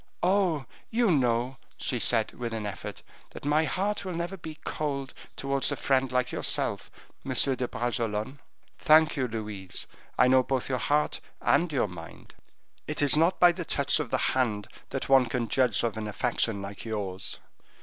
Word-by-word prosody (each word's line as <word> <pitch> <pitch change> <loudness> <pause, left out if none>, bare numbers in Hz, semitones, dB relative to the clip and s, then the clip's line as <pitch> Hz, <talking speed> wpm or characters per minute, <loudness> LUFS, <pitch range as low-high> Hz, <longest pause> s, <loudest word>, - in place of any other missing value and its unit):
"Oh! 180 -6 +2 0.2
you 230 -3 +2
know," 125 -2 +1 0.2
she 125 - -1
said, 115 -1 +3
with 120 -2 -5
an 110 -2 -3
effort, 100 - -6 0.3
"that - - -10
my 150 +2 +3
heart 200 +5 -1
will 185 -3 -4
never 170 +3 -3
be 160 -4 -9
cold 140 -3 -3 0.2
towards 135 -1 0
a - - 0
friend 130 -1 +1
like 125 0 0
yourself, - - -1 0.3
Monsieur 130 0 +2
de 125 -1 -2
Bragelonne." 120 +1 -2 0.4
"Thank 155 0 +5
you, 130 -3 0
Louise. 105 -5 -4 0.3
I 125 - +5
know 130 0 +6
both 130 0 -2
your 130 -1 0
heart 150 +6 +1 0.2
and 170 0 +2
your 135 -7 +1
mind; 85 -3 -11 0.5
it - - -1
is 145 - +6
not 165 +4 +3
by 175 -1 +7
the 175 +1 -5
touch 140 -2 +3
of 150 -5 -3
the - - +1 0.2
hand 110 -6 0 0.2
that - - -3
one 135 -2 +5
can 120 0 -2
judge 130 0 +2
of 115 -3 -1
an 110 -1 -3
affection 105 -1 0
like 100 0 -8
yours. 100 -4 -4
130 Hz, 175 wpm, -28 LUFS, 115-150 Hz, 0.5 s, by